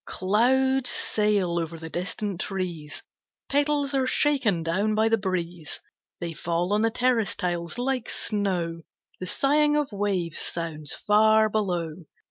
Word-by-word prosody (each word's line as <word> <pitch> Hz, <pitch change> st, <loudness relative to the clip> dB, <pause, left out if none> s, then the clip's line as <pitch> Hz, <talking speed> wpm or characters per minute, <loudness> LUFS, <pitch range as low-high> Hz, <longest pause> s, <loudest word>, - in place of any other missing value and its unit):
Clouds 255 Hz, +7 st, +2 dB
sail 205 Hz, -5 st, +1 dB
over 165 Hz, 0 st, -4 dB
the 160 Hz, 0 st, -8 dB
distant 195 Hz, +1 st, -3 dB
trees, 175 Hz, -6 st, -5 dB, 0.5 s
Petals 285 Hz, 0 st, +1 dB
are 265 Hz, -1 st, +1 dB
shaken 255 Hz, -, +2 dB
down 200 Hz, +6 st, 0 dB
by 220 Hz, +1 st, +3 dB
the 225 Hz, -, +3 dB
breeze, 175 Hz, -4 st, -4 dB, 0.4 s
They 170 Hz, -1 st, -4 dB
fall 170 Hz, +4 st, -1 dB
on 210 Hz, -, +2 dB
the 225 Hz, -, +3 dB
terrace 240 Hz, -2 st, +1 dB
tiles 175 Hz, 0 st, -3 dB
like 250 Hz, -1 st, -2 dB
snow; 180 Hz, -6 st, -1 dB, 0.4 s
The 185 Hz, -, -5 dB
sighing 295 Hz, +5 st, +2 dB
of 295 Hz, -4 st, 0 dB
waves 195 Hz, -5 st, -1 dB
sounds, 155 Hz, -4 st, -1 dB
far 215 Hz, +1 st, +4 dB
below. 175 Hz, -6 st, -2 dB
200 Hz, 135 wpm, -25 LUFS, 170-235 Hz, 0.5 s, far